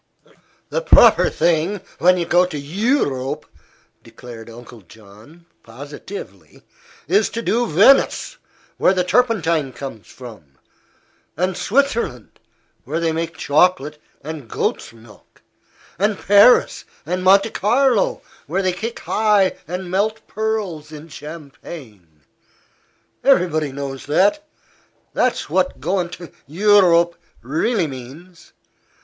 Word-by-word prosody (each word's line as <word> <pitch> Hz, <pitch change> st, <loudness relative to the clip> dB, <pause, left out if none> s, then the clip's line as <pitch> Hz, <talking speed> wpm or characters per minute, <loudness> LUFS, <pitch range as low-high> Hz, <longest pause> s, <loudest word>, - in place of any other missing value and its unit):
"The -, -, -2 dB
proper -, -, +5 dB
thing, 175 Hz, +4 st, 0 dB, 0.2 s
when 180 Hz, +1 st, +4 dB
you 170 Hz, -, -1 dB
go 175 Hz, +2 st, +3 dB
to 175 Hz, -, -6 dB
Eu 205 Hz, -, 0 dB
rope," 135 Hz, +2 st, -5 dB, 0.6 s
declared 115 Hz, -2 st, -12 dB
Uncle 115 Hz, 0 st, -13 dB
John, 110 Hz, -, -18 dB, 0.2 s
positively, 115 Hz, -, -11 dB, 0.4 s
"is 200 Hz, +6 st, +2 dB
to 230 Hz, -, -5 dB
do 235 Hz, +2 st, 0 dB
Venice, 245 Hz, -, +3 dB, 0.4 s
where 190 Hz, -, +3 dB
the 180 Hz, -, +1 dB
turpentine 170 Hz, -, +1 dB
comes 120 Hz, -9 st, -9 dB
from, 105 Hz, -, -13 dB, 0.8 s
and 185 Hz, +2 st, -1 dB
Switzerland, 235 Hz, -, -1 dB, 0.4 s
where 155 Hz, +5 st, -3 dB
they 165 Hz, -1 st, 0 dB
make 165 Hz, +1 st, -4 dB
chocolate 150 Hz, -1 st, +1 dB, 0.2 s
and 150 Hz, -5 st, -8 dB
goat's -, -, -2 dB
milk, 115 Hz, -2 st, -20 dB, 0.6 s
and 205 Hz, +1 st, +1 dB
Paris 205 Hz, +5 st, +4 dB, 0.2 s
and 180 Hz, +3 st, -3 dB
Monte 195 Hz, +3 st, +4 dB
Carlo, 240 Hz, 0 st, +1 dB, 0.2 s
where 185 Hz, +6 st, -1 dB
they 185 Hz, -1 st, +1 dB
kick 225 Hz, +6 st, -6 dB
high 210 Hz, -3 st, +2 dB
and 180 Hz, +1 st, -6 dB
melt 210 Hz, +4 st, -1 dB
pearls 205 Hz, -9 st, -3 dB
in 155 Hz, +1 st, -11 dB
champagne. 135 Hz, -, -11 dB, 1.0 s
Everybody 165 Hz, -, +2 dB
knows 135 Hz, -1 st, -7 dB
that. 205 Hz, -, +1 dB, 0.6 s
That's 250 Hz, -, 0 dB
what 185 Hz, +1 st, -1 dB
goin' 175 Hz, +5 st, -1 dB
to 175 Hz, -2 st, -10 dB, 0.2 s
Eu 205 Hz, +7 st, +4 dB
rope 170 Hz, -2 st, +3 dB, 0.3 s
really 165 Hz, -, 0 dB
means. 145 Hz, +6 st, -11 dB
170 Hz, 115 wpm, -20 LUFS, 140-200 Hz, 1.0 s, proper